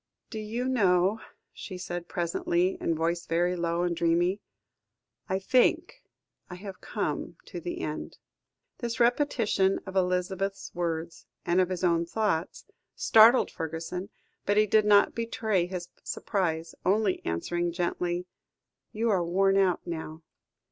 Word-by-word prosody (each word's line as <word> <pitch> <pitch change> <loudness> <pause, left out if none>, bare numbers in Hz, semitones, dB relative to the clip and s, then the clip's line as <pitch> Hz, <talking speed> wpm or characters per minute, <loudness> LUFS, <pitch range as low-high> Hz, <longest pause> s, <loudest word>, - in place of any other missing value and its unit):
"Do 220 - -4
you 225 +4 -3
know," 200 -4 +2 0.3
she 185 - -8
said 175 -1 -5
presently, 175 +1 0
her - - 0
voice 165 +1 -1
very 175 +2 +1
low 170 0 -1
and 175 -1 0
dreamy. 175 +4 +1 0.9
"I 190 - +1
think 255 - +2 0.5
I 180 - -7
have 195 +1 -9
come - - -3
to - - -7
the 350 0 -5
end." - - -5 0.6
This 235 0 -3
repetition 235 -6 +2
of 190 -1 -8
Elizabeth's 190 +1 -1
words, 170 -1 -3 0.2
and 175 +1 +3
of 180 - 0
his 185 -1 -4
own 170 -1 +2
thoughts, 195 -4 -1 0.3
startled 225 +3 +6
Fergusson, 165 +4 -5 0.3
but 205 +1 +1
he 215 - +6
did 215 +1 +3
not 205 -1 +5
betray 220 -5 0
his 180 -1 -6
surprise, 165 -5 -2
only 200 0 +1
answering 175 - -1
gently 175 0 -2 0.7
"You 225 +1 0
are 185 -3 +2
worn 195 +3 +2
out 190 -3 +2
now. 160 -1 -6
180 Hz, 135 wpm, -28 LUFS, 170-210 Hz, 0.9 s, startled